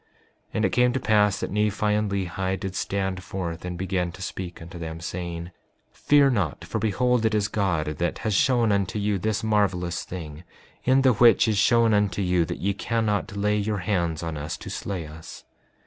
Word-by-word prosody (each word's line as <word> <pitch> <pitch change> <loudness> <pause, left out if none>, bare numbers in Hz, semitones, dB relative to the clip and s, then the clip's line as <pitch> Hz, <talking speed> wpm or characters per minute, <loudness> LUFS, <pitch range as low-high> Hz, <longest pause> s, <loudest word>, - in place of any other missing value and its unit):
5:26 - - -40 0.5
And - - +2
it - - +2
came 125 0 +3
to 130 - 0
pass 105 -4 +3
that - - -4
Nephi 105 0 0
and 105 0 +1
Lehi 95 0 -2
did 95 -3 -4
stand 95 -2 -2
forth 90 -2 -5
and 90 -1 -5
began 90 -1 -1
to 95 - -11
speak 90 -1 -6
unto 85 +1 -9
them, 80 -1 -6
saying: 85 0 -5 0.4
Fear 145 -2 +4
not, 95 - -1
for - - -3
behold, 120 +3 +1
it 110 -1 +2
is 105 -1 +1
God 95 -7 0
that 75 +3 -2
has 110 - -2
shown 120 0 +3
unto 100 0 0
you 105 -1 0
this 110 +2 -1
marvelous 95 -5 0
thing, 80 -3 -8 0.4
in 130 +1 +4
the 130 -2 +5
which 115 +1 +5
is 105 -3 +2
shown 115 +2 +4
unto 105 -1 +1
you 90 -2 +2
that - - -5
ye 100 +2 0
cannot 110 0 -1
lay 105 +1 +1
your 105 0 -1
hands 85 -6 0
on 80 -2 -4
us 75 +3 -4
to - - -8
slay 95 -5 -4
us. 80 +1 -11
100 Hz, 200 wpm, -25 LUFS, 90-110 Hz, 0.5 s, the